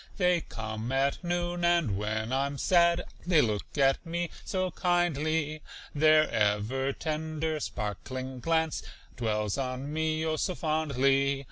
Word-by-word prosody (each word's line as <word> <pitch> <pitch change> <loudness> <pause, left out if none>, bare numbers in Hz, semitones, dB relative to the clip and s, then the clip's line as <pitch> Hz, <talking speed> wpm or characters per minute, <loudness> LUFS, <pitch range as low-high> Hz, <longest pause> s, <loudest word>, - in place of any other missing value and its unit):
They 180 -3 +3
come 110 0 -5
at 135 +5 +1
noon, 175 0 -1
and 170 - +3
when 110 +4 -2
I'm 140 +1 0
sad 170 +2 +3 0.2
They 175 -4 +5
look 110 +1 -1
at 135 -1 +3
me 170 0 -3
so 185 -1 -1
kindly, 160 -4 0 0.3
Their 155 +1 +5
ever 110 +6 +1
tender, 155 +1 -2
sparkling 130 +4 -5
glance 160 +3 0 0.3
Dwells 105 -1 -1
on 130 +2 -3
me, 160 0 0
oh, 155 -1 0
so 180 +4 -1
fondly. 140 -3 +1
150 Hz, 130 wpm, -29 LUFS, 130-165 Hz, 0.3 s, They